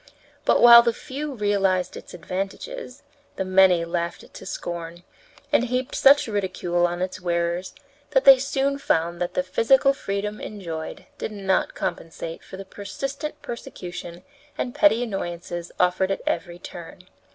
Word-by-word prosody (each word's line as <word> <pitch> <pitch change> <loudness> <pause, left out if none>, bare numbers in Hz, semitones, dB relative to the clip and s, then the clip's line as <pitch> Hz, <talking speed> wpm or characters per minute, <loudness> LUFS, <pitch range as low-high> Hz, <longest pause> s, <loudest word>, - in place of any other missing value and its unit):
But, - - +4
while 235 0 +11
the 235 -1 +1
few 295 +1 -5
realized 195 -4 +1
its - - -10
advantages, 200 - -6 0.3
the 190 - -2
many 185 -2 +5
laughed 170 0 -3
it - - -18
to - - -10
scorn, 170 0 -6 0.5
and 240 - +4
heaped 250 +1 -2
such 280 0 +5
ridicule 180 -4 0
on 175 +1 -3
its 185 0 -5
wearers 170 +2 -1 0.3
that 265 - +3
they 270 -1 +10
soon 275 +1 0
found 170 -5 0
that 175 - -2
the 180 - +1
physical 265 +8 +3
freedom 210 -3 -4
enjoyed 170 -7 -6
did - - -4
not 195 -2 0
compensate 165 0 -5
for 190 - -10
the 195 - -8
persistent 275 +10 -6
persecution 180 -6 -8 0.3
and 245 - -3
petty 220 +4 +4
annoyances 175 -5 -5
suffered 180 +1 +2
at 195 - -2
every 175 -2 -2
turn. 175 0 -10
190 Hz, 150 wpm, -24 LUFS, 175-240 Hz, 0.5 s, while